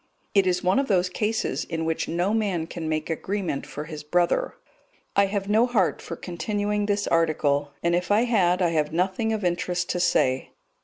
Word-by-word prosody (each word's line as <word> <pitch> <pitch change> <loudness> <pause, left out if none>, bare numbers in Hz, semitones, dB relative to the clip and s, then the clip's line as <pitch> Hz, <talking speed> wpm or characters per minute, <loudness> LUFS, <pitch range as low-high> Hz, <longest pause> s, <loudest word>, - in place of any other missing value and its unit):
It 195 -2 +4
is 180 0 +1
one 185 +6 +3
of 275 - 0
those 185 -3 +2
cases 215 +4 -1
in 165 -1 -3
which 160 0 -1
no 175 +5 0
man 200 -7 0
can 165 -1 -5
make 155 -1 -1
agreement 185 -2 -3
for 150 - -6
his 155 -1 -7
brother. 175 +3 +1 0.6
I 200 0 +4
have 195 0 -2
no 220 +4 +4
heart 210 -8 +1
for 170 - -6
continuing 205 +4 -2
this 205 0 0
article, 145 -4 +1
and 170 0 +2
if 175 +1 0
I 205 +2 +4
had, 190 -7 +2
I 175 - +3
have 155 -2 0
nothing 190 +6 0
of 215 -2 -2
interest 175 +1 -1
to 180 - -1
say. 130 -7 +2
180 Hz, 195 wpm, -25 LUFS, 165-205 Hz, 0.6 s, It